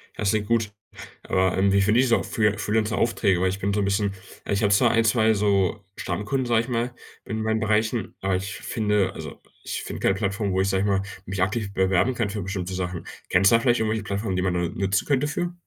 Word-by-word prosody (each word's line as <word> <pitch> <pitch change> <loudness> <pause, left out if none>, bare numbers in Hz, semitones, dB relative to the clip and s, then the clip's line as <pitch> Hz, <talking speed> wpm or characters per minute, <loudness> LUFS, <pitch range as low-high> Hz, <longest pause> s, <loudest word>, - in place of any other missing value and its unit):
Ja, - - -7
das 100 - +3
klingt 105 -1 -1
gut. 115 -2 0 0.5
Aber, 95 0 +1
ähm, 95 +1 +3
wie 100 - +4
finde 105 +4 +3
ich 130 - +4
so 115 - +2
Free 105 -1 +1
äh, 105 0 0
Freelancer-Aufträge? 105 -2 +1
Weil 95 - +2
ich 95 +1 -4
bin 100 0 -1
so 105 - +1
'n - - 0
bisschen, 100 0 0 0.3
äh - - -1
ich 100 - 0
habe 100 - +3
zwar 115 +3 +4
1, 115 0 +3
2 110 0 +3
so 100 -1 +1
Stammkunden, 130 +5 -2
sage 115 -2 +3
ich 115 - -7
mal, 120 0 -1 0.3
in 110 0 -3
meinen 110 0 0
Bereichen, 110 0 0
aber 95 -1 0
ich 95 +2 -5
f - - -12
finde 105 -3 +1
also, - - -8 0.3
ich - - -4
finde - - -6
keine 95 - +2
Plattform, 100 0 -1
wo 95 - +2
ich 95 - +1
sage 95 -1 +1
ich - - 0
mal, 100 -1 +2 0.2
mich 95 -1 -3
aktiv 100 +1 -1
bewerben 95 +6 +2
kann 115 -3 -1
für 105 +1 -4
bestimmte 95 -1 -4
Sachen. 90 -2 -4 0.2
Kennst 95 +2 +4
du - - +6
da - - +4
vielleicht 120 -1 +2
irgendwelche 110 -1 -1
Plattformen, 100 0 -2
die - - +1
man 90 -1 0
da 90 - 0
nutzen 95 +3 -1
könnte 145 0 +2
für? 175 +4 -2
105 Hz, 255 wpm, -24 LUFS, 95-110 Hz, 0.5 s, du